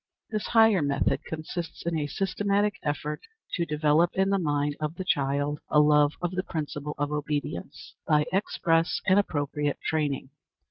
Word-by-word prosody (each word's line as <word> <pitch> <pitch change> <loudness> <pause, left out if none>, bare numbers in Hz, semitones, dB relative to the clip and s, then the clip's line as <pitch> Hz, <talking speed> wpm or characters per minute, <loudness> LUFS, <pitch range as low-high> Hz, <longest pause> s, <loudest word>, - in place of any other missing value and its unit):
This 215 -2 -2
higher 225 -5 +5
method 140 -1 0
consists 160 +2 -6
in 170 -1 0
a 150 -2 -1
systematic 200 +5 0
effort 150 +1 -3 0.3
to 170 -2 0
develop 150 +2 +3
in 195 +1 +2
the 195 - +2
mind 145 -3 0
of 155 +1 -3
the 185 - -5
child 145 -1 0
a 150 - +4
love 150 0 +5
of 175 - 0
the 185 0 -1
principle 150 -4 -4
of 145 0 -1
obedience, 145 - -4
by 150 -1 +4
express 165 -4 +1
and 190 +1 +5
appropriate 145 -5 -1
training. 145 -4 -1
150 Hz, 155 wpm, -27 LUFS, 145-180 Hz, 0.3 s, higher